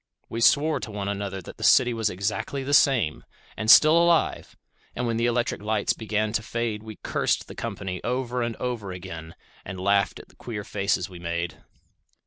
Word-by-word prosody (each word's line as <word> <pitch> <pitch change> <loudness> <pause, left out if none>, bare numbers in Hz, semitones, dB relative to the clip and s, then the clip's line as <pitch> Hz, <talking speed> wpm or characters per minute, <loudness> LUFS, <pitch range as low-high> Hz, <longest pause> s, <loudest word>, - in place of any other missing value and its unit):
We 115 - -4
sware 150 +6 +4
to - - -6
one 100 -2 -4
another 100 -2 -4
that - - -11
the - - -8
city 125 -2 +5
was 110 -2 0
exactly 100 +8 -3
the 140 +2 -2
same, 120 - +3 0.3
and 110 +1 -3
still 155 +6 +8
alive; 170 0 +2 0.4
and 125 - -2
when 115 -1 -1
the 115 +1 +1
electric 120 -2 -1
lights 105 -1 0
began 110 -1 -2
to 115 - +1
fade 115 -1 -3
we 110 0 -9
cursed - - 0
the - - -9
company 90 -1 -5
over 125 0 -2
and 115 -1 -2
over 115 -6 -4
again, 85 -3 -8 0.3
and 95 -1 -7
laughed 100 +1 +2
at - - -14
the - - -22
queer 110 -4 -6
faces 100 -3 -1
we 90 -2 -11
made. 85 -1 -4
110 Hz, 190 wpm, -25 LUFS, 95-120 Hz, 0.4 s, still